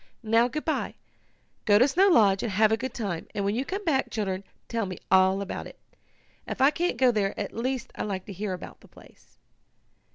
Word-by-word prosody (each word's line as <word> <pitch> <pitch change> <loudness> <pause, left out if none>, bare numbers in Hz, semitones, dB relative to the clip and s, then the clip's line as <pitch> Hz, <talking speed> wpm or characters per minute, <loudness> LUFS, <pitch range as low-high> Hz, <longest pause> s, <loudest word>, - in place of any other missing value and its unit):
"Now, 225 +2 +3
good 305 +4 -5
bye. 315 - -1 0.7
Go 205 -2 +6
to 250 +5 +5
Snow 365 +8 +4
Lodge, 205 - +5
and 230 - -2
have 215 +2 +4
a - - +4
good 260 +3 -5
time, 195 -9 -4
and 200 -1 -1
when 200 - +1
you 245 +4 -1
come 390 +8 -5
back, 275 -5 +1
children, 195 -3 -3 0.2
tell 230 -3 -2
me 185 - -6
all 190 +1 +4
about 195 - -6
it. - - -14 0.7
If - - -5
I 270 +2 +6
can't 350 +3 -1
go 255 -2 +5
there 205 -3 -1
at 200 - -4
least 255 +1 -3
I - - -6
like 190 -3 -3
to 200 - -8
hear 195 +1 -3
about 180 - -9
the - - -17
place." - - -20
220 Hz, 220 wpm, -27 LUFS, 195-260 Hz, 0.7 s, Go